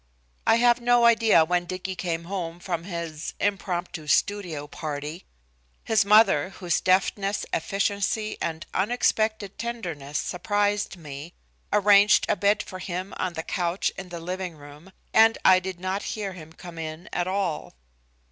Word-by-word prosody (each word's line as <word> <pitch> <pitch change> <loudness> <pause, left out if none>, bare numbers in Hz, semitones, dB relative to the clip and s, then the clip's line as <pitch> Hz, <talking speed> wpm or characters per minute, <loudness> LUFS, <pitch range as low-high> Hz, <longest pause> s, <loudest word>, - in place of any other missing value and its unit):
I - - +6
have 240 +1 +4
no 240 0 +4
idea 225 -8 +5
when 175 +1 0
Dicky 185 +1 -4
came 170 -2 -3
home 175 -2 -5
from 170 -2 -4
his 170 -4 -5
"impromptu 180 -5 -2
studio 175 -4 0
party." 150 +2 -6 0.6
His 220 -1 +3
mother, 200 -6 +5
whose 175 -3 0
deftness, 195 +2 +1
efficiency 200 +4 -1
and 160 -1 -3
unexpected 215 -1 0
tenderness 170 -12 -4
surprised 205 +2 -1
me, 150 +1 -9 0.4
arranged 205 0 +5
a - - +2
bed 200 +3 +2
for 185 - -9
him 185 +2 -5
on 185 -2 -2
the 160 - -4
couch 175 +1 -1
in 190 -1 -8
the 170 -1 -6
living 180 0 -5
room, 145 +5 -14 0.2
and 225 0 +6
I 185 -1 +7
did 185 -1 -6
not 185 +2 -2
hear 205 -4 -4
him 160 -3 -11
come 170 0 -10
in 160 +2 -6
at 175 0 0
all. 185 - -2
185 Hz, 145 wpm, -25 LUFS, 165-205 Hz, 0.6 s, I